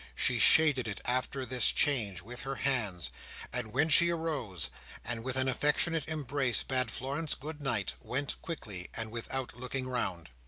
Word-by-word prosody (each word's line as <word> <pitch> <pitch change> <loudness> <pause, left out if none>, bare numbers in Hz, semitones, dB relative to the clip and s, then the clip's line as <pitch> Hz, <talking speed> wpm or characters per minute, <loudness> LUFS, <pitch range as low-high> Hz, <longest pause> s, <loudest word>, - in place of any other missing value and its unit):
She - - +3
shaded 145 -6 +6
it, 100 - -5
after 130 +1 -1
this 125 0 +3
change, 105 - +1
with 125 +4 -6
her 135 0 -5
hands; 115 - 0 0.4
and 120 -4 -3
when 140 +7 +2
she 170 +3 +8
arose, 150 - -3 0.3
and 115 -1 -2
with 130 +1 -2
an 130 0 +3
affectionate 150 +4 +1
embrace 140 -6 0
bade 130 -2 -1
Florence 140 +7 -2
good 150 +2 -8
night, 115 -9 -1
went 135 +2 -3
quickly, 105 - -6
and 115 -1 -3
without 120 +2 -4
looking 130 +1 -4
round. 95 - -3
130 Hz, 160 wpm, -30 LUFS, 115-145 Hz, 0.4 s, she